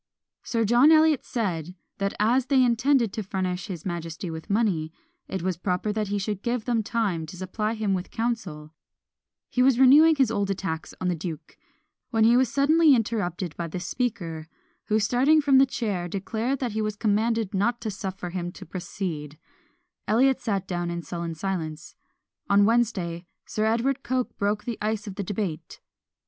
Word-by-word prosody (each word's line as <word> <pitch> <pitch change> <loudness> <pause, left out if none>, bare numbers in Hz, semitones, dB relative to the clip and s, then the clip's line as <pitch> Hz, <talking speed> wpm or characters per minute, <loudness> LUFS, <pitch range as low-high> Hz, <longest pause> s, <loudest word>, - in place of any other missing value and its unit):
Sir 230 -2 -1
John 240 +8 +6
Eliot 315 -3 +5
said, 180 - -3 0.2
that 200 0 -1
as 240 +5 +2
they 265 -2 +4
intended 240 -1 +2
to 220 - -3
furnish 185 -2 -3
his 175 -6 -7
majesty 170 -1 -4
with 160 +5 -8
money, 195 -7 +1 0.4
it 190 -3 -4
was 185 -2 -1
proper 180 +3 -1
that 215 -1 -1
he 205 +1 -1
should 200 0 -3
give 235 -1 -2
them 235 -2 +1
time 200 -7 -1
to 180 - -10
supply 210 +4 -2
him 215 -3 0
with 185 -1 -3
counsel: 185 -10 -3 0.7
he 250 - 0
was 260 -1 +5
renewing 300 +5 +7
his 265 -6 +2
old 200 -3 -1
attacks 185 -5 -4
on 185 - -2
the 180 - +2
duke, 165 -1 -7 0.5
when 225 -2 +2
he 230 +2 +6
was 255 0 +3
suddenly 300 +1 +5
interrupted 190 -7 -2
by 170 - -3
the 170 +3 -5
Speaker, 175 -8 -3 0.4
who, 215 - +2
starting 250 +9 +4
from 280 -3 +5
the 270 - +6
chair, 205 -9 -2
declared 220 +8 -2
that 250 -3 -2
he 220 +1 -2
was 215 -1 -2
commanded 220 0 0
not 225 +5 +1
to 220 -2 -3
suffer 190 -2 -5
him 175 -1 -3
to - - -10
proceed; 165 -4 -5 0.7
Eliot 260 +5 +3
sat 200 -5 -2
down 175 -1 -2
in 170 0 -4
sullen 170 -1 -5
silence. 160 -3 -4 0.6
On 200 0 +5
Wednesday, 205 -7 0 0.2
Sir 215 - -1
Edward 240 +5 +1
Coke 255 -1 -2
broke 205 +1 0
the 235 0 -5
ice 215 0 -1
of 200 - -6
debate. 195 -4 -4
205 Hz, 175 wpm, -26 LUFS, 180-235 Hz, 0.7 s, renewing